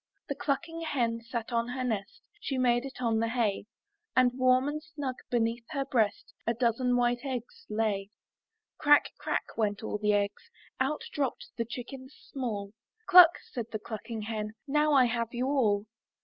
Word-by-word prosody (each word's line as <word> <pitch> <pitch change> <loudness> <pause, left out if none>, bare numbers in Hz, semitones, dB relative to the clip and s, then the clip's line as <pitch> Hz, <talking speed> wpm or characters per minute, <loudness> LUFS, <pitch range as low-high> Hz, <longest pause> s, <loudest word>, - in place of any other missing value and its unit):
'* - - -43
The - - +1
clucking 330 +4 -2
hen 235 -7 0
sat 235 0 -5
on 230 0 +1
her 255 +1 -3
nest. 220 -5 -3 0.2
She 270 - -3
made 245 0 +2
it 270 - -8
on 225 -2 +2
the 230 - +1
hay; 225 -4 0 0.5
And 255 -1 +5
warm 255 +1 +3
and 300 +1 -2
snug 295 -4 -4 0.2
beneath 230 0 0
her 275 -2 -1
breast, 225 -6 0
A 230 - +2
dozen 245 +1 +2
white 240 0 +1
eggs 255 -4 -5
lay. 210 -2 0 0.7
Crack, 295 0 +5
crack, - - -2
went 210 -1 0
all 210 - -3
the 210 0 +2
eggs, 205 - -1 0.3
Out 270 +3 0
dropped 275 -4 -2
the 230 - -1
chickens 260 +3 -8 0.2
small; 215 -7 -3 0.3
"Cluck, 360 -3 +9 0.2
said 235 -3 -4
the 215 - -2
clucking 220 +1 -6
hen, 215 -1 -4
"Now 300 +1 +3
I 265 -3 +6
have 235 0 -2
you 245 +2 0
all. 220 -7 +2
245 Hz, 175 wpm, -30 LUFS, 225-270 Hz, 0.7 s, Cluck